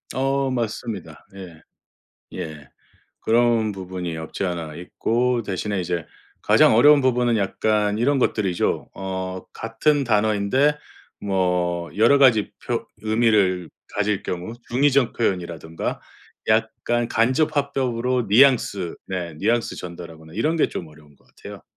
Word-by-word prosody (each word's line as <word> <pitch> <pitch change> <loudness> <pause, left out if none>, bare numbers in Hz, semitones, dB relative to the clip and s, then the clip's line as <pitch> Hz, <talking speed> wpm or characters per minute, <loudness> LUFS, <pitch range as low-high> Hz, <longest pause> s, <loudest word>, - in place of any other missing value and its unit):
어 135 +1 0
맞습니다. 115 -4 -4
예. 90 -5 -11 0.7
예. 75 -3 -7 0.5
그런 115 -1 +2
부분이 90 -3 -5
없지 80 +4 -5
않아 85 -4 -4
있고 120 +7 -1
대신에 100 0 -3
이제 85 -2 -3 0.4
가장 - - +5
어려운 145 +5 +7
부분은 125 -3 +2
약간 105 +1 0
이런 135 +4 +2
것들이죠. 100 -8 0
어 95 -1 -5
같은 140 +6 0
단어인데 110 +6 +2 0.4
뭐 90 -3 0
여러 115 +7 +5
가지 120 -6 +4
표 - - -2 0.2
의미를 110 -6 +2 0.2
가질 105 -1 0
경우 90 +5 -5 0.2
중의적 135 0 +2
표현이라든가 85 -6 -3 0.5
약간 120 0 +1
간접 130 +7 +1
화법으로 130 -3 0
뉘앙스 110 -6 +3
네 90 -3 -4
뉘앙스 110 +8 0
전달하거나 85 -2 -10
이런 155 - 0
게 160 - +2
좀 85 - -6
어려운 75 -2 -19
것 - - -30
같아요. - - -12
105 Hz, 275 characters per minute, -22 LUFS, 90-120 Hz, 0.7 s, 어려운